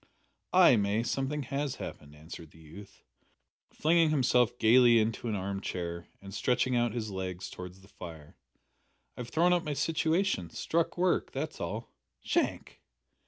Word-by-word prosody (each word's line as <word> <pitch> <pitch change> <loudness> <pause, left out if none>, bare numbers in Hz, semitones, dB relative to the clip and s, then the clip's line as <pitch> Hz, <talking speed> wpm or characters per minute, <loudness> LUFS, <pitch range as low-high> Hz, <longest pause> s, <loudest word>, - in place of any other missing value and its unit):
"Ay, - - +6
May, 105 +2 +1
something 135 +4 -2
has 140 +1 -3
happened," 75 0 -9
answered 80 +1 -11
the 80 - -20
youth, 90 +6 -14 0.7
flinging 165 0 +3
himself 125 -4 +2
gaily 120 +1 +6
into 115 +1 0
an 110 - -1
arm 95 0 -3
chair 85 -2 -5
and 100 0 -11
stretching 125 +3 +1
out 120 -1 +2
his 110 -3 -3
legs 95 -1 -5
towards 90 +1 -9
the 95 - -18
fire; 80 -6 -11 0.8
"I - - -14
have 120 -1 -6
thrown 175 +2 +3
up 175 - +2
my 150 - -2
situation. 160 - 0
Struck 165 - -1
work. 180 0 +1
That's 150 +3 -4
all." 105 +7 -5 0.3
"Shank!" - - -1
115 Hz, 155 wpm, -30 LUFS, 95-145 Hz, 0.8 s, Ay